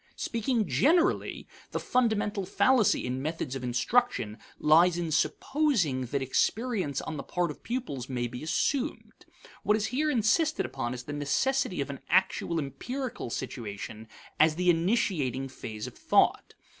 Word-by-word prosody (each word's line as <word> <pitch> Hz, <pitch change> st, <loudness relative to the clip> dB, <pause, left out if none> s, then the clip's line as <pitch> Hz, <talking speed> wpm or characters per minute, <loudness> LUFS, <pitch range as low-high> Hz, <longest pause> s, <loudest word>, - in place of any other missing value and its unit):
Speaking 230 Hz, -2 st, -1 dB
generally, 325 Hz, -, +2 dB, 0.2 s
the -, -, -3 dB
fundamental 215 Hz, -5 st, +1 dB
fallacy 210 Hz, +3 st, +3 dB
in 125 Hz, +1 st, -2 dB
methods 155 Hz, -3 st, -3 dB
of 130 Hz, -, -5 dB
instruction 125 Hz, -, +1 dB, 0.2 s
lies 170 Hz, +3 st, +5 dB
in 170 Hz, -2 st, -2 dB
supposing 170 Hz, -, +1 dB
that 135 Hz, +2 st, -1 dB
experience 190 Hz, -, 0 dB
on 160 Hz, -, -5 dB
the -, -, -3 dB
part 175 Hz, -3 st, -1 dB
of -, -, -12 dB
pupils 230 Hz, -, -4 dB
may 125 Hz, -2 st, -1 dB
be 125 Hz, +1 st, -6 dB
assumed. 265 Hz, -, -2 dB, 0.3 s
What 210 Hz, +1 st, +3 dB
is 215 Hz, -, -1 dB
here 305 Hz, +4 st, +1 dB
insisted 290 Hz, +5 st, +2 dB
upon 120 Hz, +1 st, -3 dB
is 125 Hz, -, -7 dB
the 145 Hz, -, -6 dB
necessity 180 Hz, -, 0 dB
of 140 Hz, +1 st, -3 dB
an 140 Hz, -, -8 dB
actual 180 Hz, -2 st, +2 dB
empirical 190 Hz, -, -4 dB
situation 110 Hz, -1 st, -6 dB, 0.3 s
as 155 Hz, 0 st, +5 dB
the 180 Hz, +1 st, +4 dB
initiating 165 Hz, -, 0 dB
phase 110 Hz, -4 st, -7 dB
of -, -, -7 dB
thought. -, -, +2 dB
170 Hz, 145 wpm, -29 LUFS, -, 0.3 s, lies